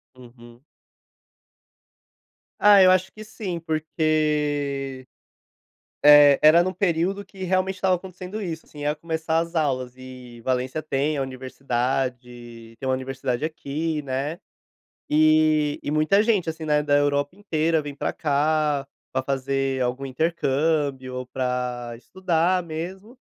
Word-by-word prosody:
Uhum. 120 -1 -16 2.0
Ah, 205 -1 +7
eu 185 - +7
acho 185 +1 +2
que 215 - -11
sim, 205 -5 -5
porque, 150 -4 -1 1.0
eh, 145 -1 +8
era 155 +3 +7
no 185 +1 -2
período 185 +2 0
que, 190 -1 -9
realmente, 185 +1 0
estava 185 0 +2
acontecendo 185 +3 -8
isso, 165 -4 -5
assim, 150 - -13
ia 145 +1 0
começar 160 +1 -2
as 165 +1 -3
aulas, 130 -6 -1
e 125 -2 -12
Valencia 130 +4 -1
tem 150 0 -1
a 140 - 0
universidade 125 -2 -4
tem 135 - -6
uma 130 - +1
universidade 130 -1 -3
aqui, 155 0 -3
né, 140 +4 -3 0.7
e 155 -1 +3
e 145 - -4
muita 155 +7 +3
gente, 205 -8 +1
assim, 160 0 -7
né, 150 -1 +2
da 145 -1 +1
Europa 145 +3 0
inteira, 165 -5 0
vem 145 -1 -7
pra 145 - -2
cá, 150 -1 +1 0.3
pra 130 - -1
fazer 135 0 -1
algum 125 +2 -1
intercâmbio 140 -2 -1
ou 130 0 -4
pra 125 -2 -3
estudar 180 +5 0
mesmo, 185 +8 -7
150 Hz, 130 wpm, -24 LUFS, 130-165 Hz, 2.0 s, eh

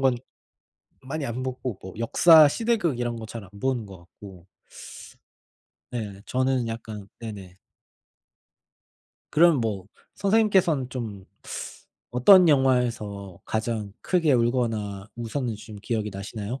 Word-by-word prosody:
건 130 -2 +3 0.8
많이 140 +3 -5
안 120 +2 -4
보고 130 -4 -4
뭐 95 - -9
역사 155 +6 +7
시대극 215 - 0
이런 120 -1 -2
거 110 -1 -7
잘 115 -1 -8
안 95 - -16
보는 130 -5 -1
것 95 -2 -11
같고 90 +1 -14 1.4
네. 105 -5 -5
저는 130 -1 0
약간 110 -3 -7
네네. 100 -5 -8 1.7
그럼 160 -4 +5
뭐 100 -5 -2 0.3
선생님께서는 195 - +2
좀 110 -7 -6 0.9
어떤 180 +9 +7
영화에서 120 - +1
가장 110 -2 -3
크게 165 -5 +2
울거나 115 -5 0
웃었는지 120 -2 -4
좀 110 - -9
기억이 110 -1 -2
나시나요? 105 +5 -6
120 Hz, 230 characters per minute, -25 LUFS, 105-135 Hz, 1.7 s, 역사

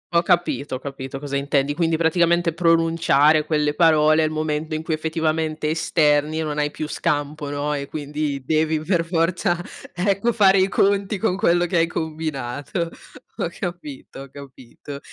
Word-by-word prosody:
Ho 170 0 +4
capito, 170 -6 0
ho - - -5
capito 135 -1 -7
cosa 140 0 -3
intendi. 140 0 0
Quindi 165 +1 0
praticamente 170 +1 +2
pronunciare 165 -3 +3
quelle 150 -1 0
parole 155 -1 +4
è - - +3
il 155 - -2
momento 155 0 -2
in 155 - -4
cui 160 - -2
effettivamente 155 -1 -1
esterni 155 -1 +1
e - - -1
non 150 -1 -4
hai 150 0 +1
più 155 +1 -5
scampo, 150 -2 -2
no, 145 +1 -2
e 140 -1 -4
quindi 145 -2 -4
devi, 155 +2 +1
per 170 +1 0
forza, 170 +2 0 0.4
ecco, 200 +5 0
fare 195 -3 +5
i 190 - +3
conti 200 +1 +1
con 190 -1 0
quello 175 -4 +2
che 175 0 -1
hai 165 0 +3
combinato. 155 -1 -4 0.5
Ho - - -1
capito, 175 -8 -7
ho 140 - -13
capito. 140 0 -11
155 Hz, 165 wpm, -22 LUFS, 145-170 Hz, 0.5 s, fare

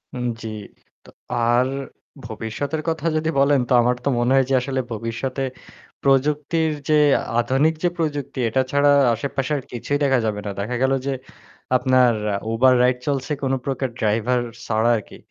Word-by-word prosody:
উ - - -4 0.2
জ্বি। 110 - -5 0.5
তো - - -17 0.4
আর 125 +2 +3 0.6
ভবিষ্যতের 110 +8 -4
কথা 160 -1 -3
যদি 155 +1 0
বলেন 140 0 +4
তো - - +3
আমার 125 +1 +2
তো - - +2
মনে 120 +1 +1
হয় 135 -1 +4
যে - - +1
আসলে 130 0 -2
ভবিষ্যতে 115 +5 -3 0.6
প্রযুক্তির 150 +4 +2 0.2
যে - - +4 0.5
আধুনিক 135 +6 +2
যে 175 - +3
প্রযুক্তি 145 -5 -3
এটা 130 +4 +2
ছাড়া 140 0 +3 0.2
আশেপাশে 135 +4 -3
আর 135 - -6
কিছুই 125 +4 -2
দেখা 135 -2 +3
যাবে 105 -2 -1
না। - - -3
দেখা 105 +5 -3
গেল 135 0 +3
যে 140 - 0 0.6
আপনার 125 -1 +4 0.4
Uber 130 +3 +4
রাইড 125 0 +3
চলছে 140 0 -1
কোনো 135 0 +1
প্রকার 135 -1 -2
ড্রাইভার 115 +3 +1 0.2
ছাড়া 110 +1 +1
আরকি। 105 - -10
130 Hz, 160 wpm, -22 LUFS, 120-140 Hz, 0.6 s, বলেন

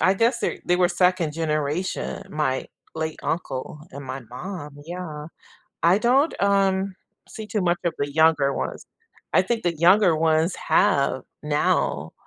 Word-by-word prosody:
I 190 - +4
guess 235 +4 +2
their - - -1
they 180 - +2
were 180 -1 +3
2nd 180 -3 +2
generation, 155 +2 -2
my 150 -4 -1 0.3
late 160 -1 -3
uncle 150 -3 -4
and 140 0 -9
my 135 +1 -5
mom, 150 +1 -7
yeah. 160 -3 -6 0.6
I 175 +4 +5
don't, 265 +8 +3
um, 195 -1 +2 0.3
see 220 - -8
too 210 -1 -2
much 175 -1 +1
of 170 - +1
the 145 0 -1
younger 155 -3 +3
ones. - - -4 0.5
I - - +5
think 235 -1 -2
the 170 -2 0
younger 175 +1 +5
ones 160 +2 +2
have 140 -1 +2 0.2
now 145 - 0
170 Hz, 150 wpm, -24 LUFS, 150-190 Hz, 0.6 s, I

